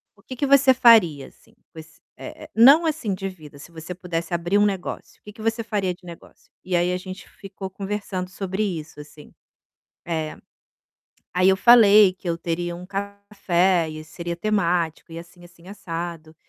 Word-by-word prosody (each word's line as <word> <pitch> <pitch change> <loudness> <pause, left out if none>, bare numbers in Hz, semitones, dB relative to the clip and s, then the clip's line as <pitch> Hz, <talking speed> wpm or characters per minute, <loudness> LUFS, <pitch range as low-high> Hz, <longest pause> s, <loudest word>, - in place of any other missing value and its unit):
o - - -24
que 255 - -9
que 270 - -1
você 275 -1 +5
faria, 220 - +4
assim, - - -23 0.2
com 160 - -11
ess 155 0 -15 0.2
eh, 130 - -10
eh, - - -12
não 275 +9 +7
assim 305 -10 -2
de 195 +1 -4
vida, 155 -6 -14
se 150 +4 -14
você 165 +2 -8
pudesse 170 -1 -5
abrir 175 +3 0
um 205 - +4
negócio, 195 -3 -5
que 210 - -11
que 215 - -14
você 225 +1 -1
faria 205 -5 -2
de 180 - -21
negócio?". 170 -1 -14
E 185 -1 -2
aí 175 +1 +1
a 180 - -1
gente 185 0 -10
ficou 195 -1 -9
conversando 195 -1 -5
sobre 195 +1 -4
isso, 160 -6 -5
assim. 150 0 -14 0.7
Eh, 160 -2 -4 1.0
aí 185 +1 +3
eu 190 - +4
falei 210 -3 +6
que 185 0 -12
eu 170 - 0
teria 175 +1 -4
um 180 +1 -10
café 195 -3 -1
e 155 0 -8
seria 170 +2 -6
temático 175 -5 -1
e 165 - -7
assim, 175 +1 -15
assim, 175 0 -19
assado, 165 -4 -7
180 Hz, 185 wpm, -22 LUFS, 170-205 Hz, 1.0 s, não